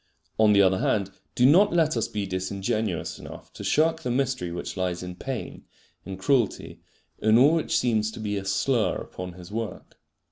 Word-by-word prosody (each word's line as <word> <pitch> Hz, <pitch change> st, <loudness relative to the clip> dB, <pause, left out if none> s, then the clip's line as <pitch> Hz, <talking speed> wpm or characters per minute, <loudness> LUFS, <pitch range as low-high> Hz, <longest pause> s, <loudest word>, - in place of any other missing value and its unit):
On 110 Hz, -1 st, +6 dB
the 100 Hz, -1 st, +6 dB
other 95 Hz, 0 st, +3 dB
hand, 100 Hz, -2 st, 0 dB, 0.2 s
do 125 Hz, -, +4 dB
not 185 Hz, +9 st, +6 dB
let 160 Hz, -4 st, +2 dB
us 115 Hz, -, 0 dB
be 105 Hz, -1 st, -3 dB
disingenuous 95 Hz, +1 st, -2 dB
enough -, -, -11 dB
to -, -, -9 dB
shirk 160 Hz, +1 st, +2 dB
the 155 Hz, -, -4 dB
mystery 125 Hz, -8 st, -1 dB
which 85 Hz, -, -5 dB
lies 90 Hz, -1 st, -2 dB
in 90 Hz, 0 st, -6 dB
pain, 130 Hz, +4 st, -6 dB, 0.4 s
in 95 Hz, -1 st, -6 dB
cruelty, 115 Hz, +3 st, 0 dB, 0.4 s
in 110 Hz, +1 st, +4 dB
all 140 Hz, +6 st, +6 dB
which 165 Hz, -2 st, +1 dB
seems 110 Hz, -3 st, +1 dB
to -, -, -9 dB
be 105 Hz, -1 st, -2 dB
a 100 Hz, -, -3 dB
slur 120 Hz, +3 st, +1 dB
upon 90 Hz, -1 st, -7 dB
His 90 Hz, +1 st, -12 dB
work. 115 Hz, 0 st, -6 dB
110 Hz, 185 wpm, -26 LUFS, 95-130 Hz, 0.4 s, On